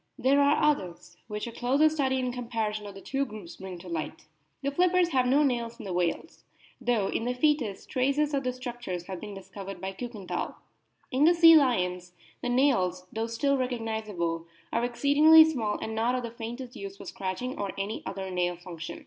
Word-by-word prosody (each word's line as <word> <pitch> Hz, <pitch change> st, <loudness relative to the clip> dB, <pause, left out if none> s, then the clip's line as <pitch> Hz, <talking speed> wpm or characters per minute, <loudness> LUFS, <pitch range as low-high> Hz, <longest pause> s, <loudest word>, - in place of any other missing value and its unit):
There 275 Hz, +2 st, +4 dB
are 285 Hz, +1 st, +3 dB
others, 190 Hz, -, 0 dB
which 210 Hz, -1 st, -4 dB
a 235 Hz, -, -6 dB
closer 265 Hz, +6 st, +3 dB
study 275 Hz, -4 st, +1 dB
and 250 Hz, -1 st, -1 dB
comparison 225 Hz, -4 st, -3 dB
of 200 Hz, -, -9 dB
the 195 Hz, -, -10 dB
two 275 Hz, +5 st, -1 dB
groups 210 Hz, -9 st, -9 dB
bring 190 Hz, -1 st, -7 dB
to 175 Hz, +2 st, -12 dB
light. 165 Hz, -3 st, -5 dB, 0.4 s
The 280 Hz, -, 0 dB
flippers 360 Hz, +3 st, +3 dB
have 255 Hz, -5 st, +2 dB
no 280 Hz, +4 st, +4 dB
nails 235 Hz, -4 st, -1 dB
in 220 Hz, -, -9 dB
the 190 Hz, -, -4 dB
whales, 175 Hz, -, -2 dB, 0.4 s
though 225 Hz, -5 st, +1 dB
in 225 Hz, -, -2 dB
the 250 Hz, +1 st, -1 dB
foetus 255 Hz, -8 st, +1 dB
traces 280 Hz, +3 st, +1 dB
of 275 Hz, -1 st, 0 dB
the 255 Hz, -, 0 dB
structures 240 Hz, -8 st, -5 dB
o 190 Hz, -, -11 dB
have 185 Hz, -, -4 dB
been 210 Hz, -2 st, -7 dB
discovered 195 Hz, 0 st, -8 dB
by 190 Hz, 0 st, -4 dB
Kiikenthal. 215 Hz, -3 st, -5 dB, 0.6 s
In 270 Hz, +3 st, +3 dB
the 345 Hz, +2 st, +6 dB
sea 330 Hz, -1 st, +9 dB
lions 180 Hz, -, +2 dB, 0.3 s
the -, -, -2 dB
nails, 230 Hz, -9 st, +2 dB
though 225 Hz, +1 st, -1 dB
still 275 Hz, +5 st, +1 dB
recognisable, 220 Hz, -9 st, -2 dB, 0.3 s
are 230 Hz, -, +1 dB
exceedingly 290 Hz, +6 st, +7 dB
small, 240 Hz, -10 st, -1 dB
and 220 Hz, -, -5 dB
not 230 Hz, +3 st, +1 dB
of 250 Hz, -, -2 dB
the 235 Hz, -, -5 dB
faintest 240 Hz, +2 st, -7 dB
use 195 Hz, -2 st, -7 dB
for -, -, -10 dB
scratching 195 Hz, +7 st, -4 dB
or 200 Hz, -, -2 dB
any 200 Hz, +3 st, -3 dB
other 190 Hz, 0 st, -5 dB
nail 180 Hz, -1 st, 0 dB
function. 170 Hz, -2 st, -8 dB
235 Hz, 200 wpm, -28 LUFS, 195-270 Hz, 0.6 s, sea